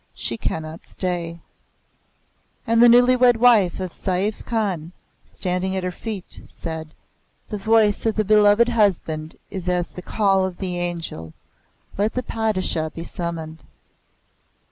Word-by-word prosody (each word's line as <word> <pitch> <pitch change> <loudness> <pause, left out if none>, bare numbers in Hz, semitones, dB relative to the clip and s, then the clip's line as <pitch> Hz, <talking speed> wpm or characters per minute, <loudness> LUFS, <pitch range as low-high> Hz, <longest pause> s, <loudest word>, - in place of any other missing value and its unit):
She 115 - -3
cannot 160 +6 -5
stay." 170 -2 -3 1.2
And 230 -1 +3
the 240 - +8
newly 245 +2 +6
wed 245 -2 +5
wife 220 -7 +4
of 185 -2 -4
Saif 190 +5 -2
Khan, 190 -8 -2 0.3
standing 185 +1 -2
at 190 - -2
her 180 - -2
feet, 205 -1 -7
said, 160 -2 -7 0.5
"The 210 - -4
voice 215 0 +3
of 220 - +1
the 215 - +1
beloved 210 +3 +5
husband 170 -8 0 0.2
is 185 -2 -4
as 180 -1 0
the 180 - -8
Call 195 0 +2
of 185 -1 -3
the 180 -2 -3
Angel. 165 - -4 0.7
Let 210 +2 +1
the 255 - -2
Padishah 195 -9 -1
be 165 - -5
summoned." 165 -2 -6
185 Hz, 140 wpm, -22 LUFS, 170-220 Hz, 1.2 s, the